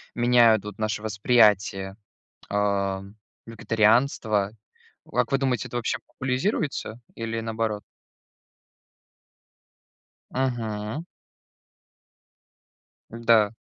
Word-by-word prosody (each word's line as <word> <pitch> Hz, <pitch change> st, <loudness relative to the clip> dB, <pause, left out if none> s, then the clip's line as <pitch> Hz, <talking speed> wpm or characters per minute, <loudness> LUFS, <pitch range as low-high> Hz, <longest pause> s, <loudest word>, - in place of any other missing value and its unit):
меняют 120 Hz, -3 st, +5 dB
вот 105 Hz, -1 st, -8 dB
наше 110 Hz, -1 st, -1 dB
восприятие, 105 Hz, -3 st, +2 dB, 0.5 s
ам, 100 Hz, -1 st, -1 dB, 0.3 s
вегетарианства? 110 Hz, -2 st, +2 dB, 0.5 s
Вот -, -, -10 dB
как 125 Hz, +2 st, +1 dB
вы 135 Hz, -, +3 dB
думаете, 130 Hz, -3 st, 0 dB
это 120 Hz, -, -4 dB
вообще 120 Hz, -, -1 dB
популязируется, 130 Hz, -, -2 dB, 0.2 s
или 115 Hz, 0 st, -3 dB
наоборот? 110 Hz, -2 st, -2 dB, 2.5 s
Мгм. 115 Hz, +1 st, -2 dB, 2.1 s
Да. 115 Hz, -3 st, +3 dB
110 Hz, 75 wpm, -25 LUFS, 105-120 Hz, 2.5 s, меняют